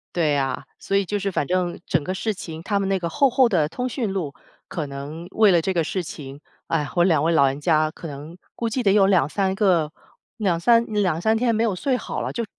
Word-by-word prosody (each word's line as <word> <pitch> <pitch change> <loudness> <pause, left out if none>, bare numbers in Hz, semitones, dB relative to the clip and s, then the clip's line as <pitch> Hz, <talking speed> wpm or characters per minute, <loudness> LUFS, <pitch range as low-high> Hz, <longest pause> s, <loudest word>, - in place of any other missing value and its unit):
对 155 -4 +2
啊， 135 -1 -2 0.2
所 195 - -2
以 200 - +3
就 205 +3 -2
是 200 0 -1
反 175 - -1
正 180 +1 -1
整 160 - +1
个 185 +6 -3
事 215 +3 -2
情， 165 -4 -8
他 200 +1 0
们 195 - -1
那 195 - +1
个 170 -2 -3
厚 275 +9 +3
厚 255 0 +4
的 165 -8 +2
通 250 +10 -3
讯 230 -6 -2
录， 165 -8 -3 0.4
可 160 - -3
能 145 +4 -7
为 215 -2 +5
了 170 -2 +4
这 190 +3 -1
个 170 -2 +1
事 185 +4 -2
情， 140 -3 -9 0.3
唉， 150 -3 0
我 175 - +4
2 165 -5 +3
位 165 +2 +2
老 140 -4 +5
人 135 +2 -2
家， 155 -1 +2
可 165 - -9
能 150 +4 -9 0.2
估 230 - -2
计 250 +3 -1
得 195 -4 +3
有 200 -2 +5
2-3 190 +1 +2
个 180 -7 +2 0.5
2-3 215 +4 +3
2-3 210 0 +1
天 235 -1 +1
没 225 +2 +1
有 205 - 0
睡 255 +7 0
好 - - -5
了， - - -3
就 235 - -3
180 Hz, 240 characters per minute, -23 LUFS, 155-210 Hz, 0.5 s, 为